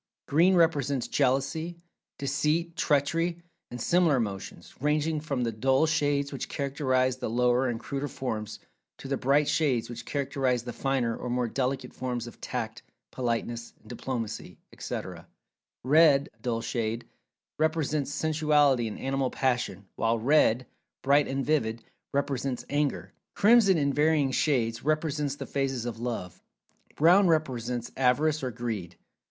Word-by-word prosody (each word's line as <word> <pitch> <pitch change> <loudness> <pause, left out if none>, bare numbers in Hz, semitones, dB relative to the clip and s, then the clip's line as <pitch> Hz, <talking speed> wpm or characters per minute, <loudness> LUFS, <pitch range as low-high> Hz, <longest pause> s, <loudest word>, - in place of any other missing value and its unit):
Green 175 +6 +4
represents 145 -6 +2
Jealousy, 145 +5 0 0.4
Deceit,[Pg 150 +4 0
222] 165 +4 +1
Treachery, 170 - -23 0.3
and 125 - -7
similar 170 +3 +3
emotions, 100 -7 -4
ranging 150 +2 +1
from 140 -5 -2
the 115 - 0
dull 130 +7 +2
shades 145 -3 0
which 135 - -5
characterize 130 -2 0
the 130 - -3
lower 125 +2 +2
and 115 -2 -3
cruder 140 +3 -4
forms, 110 -6 -4 0.4
to - - -9
the 135 - 0
bright 140 +3 +2
shades 130 -7 +1
which 120 0 -7
characterize 135 -3 -1
the 120 -1 -6
finer, 130 -4 0
or 125 - -6
more 125 0 0
delicate 130 +1 -2
forms 125 -2 -3
of 120 - -12
"Tact," 115 -3 -4 0.3
"Politeness," 120 -1 -3
"Diplomacy," 120 -2 -5 0.2
etc. - - -6 0.6
Red 145 0 +5
(dull 115 -1 -1
shade) 115 0 -2 0.5
represents 155 -2 0
Sensuality 150 -5 +2
and 110 - -6
Animal 135 -1 -1
Passion, 125 -7 -1
while 115 +1 +1
red 125 -1 +3 0.4
(bright 140 +1 +4
and 135 0 -2
vivid) 115 -7 0 0.3
represents 135 -2 -2
Anger. 145 0 -1 0.2
Crimson, 205 -3 +5
in 140 -2 +1
varying 150 -2 +2
shades, 120 -5 0
represents 150 -1 0
the - - -6
phases 135 -4 -2
of 115 -2 -5
"Love." 115 -7 -5 0.5
Brown 180 +5 +5
represents 125 -7 -1
Avarice 145 +4 +2
or 130 - -2
Greed. 110 -8 -5
135 Hz, 135 wpm, -28 LUFS, 120-150 Hz, 0.6 s, Red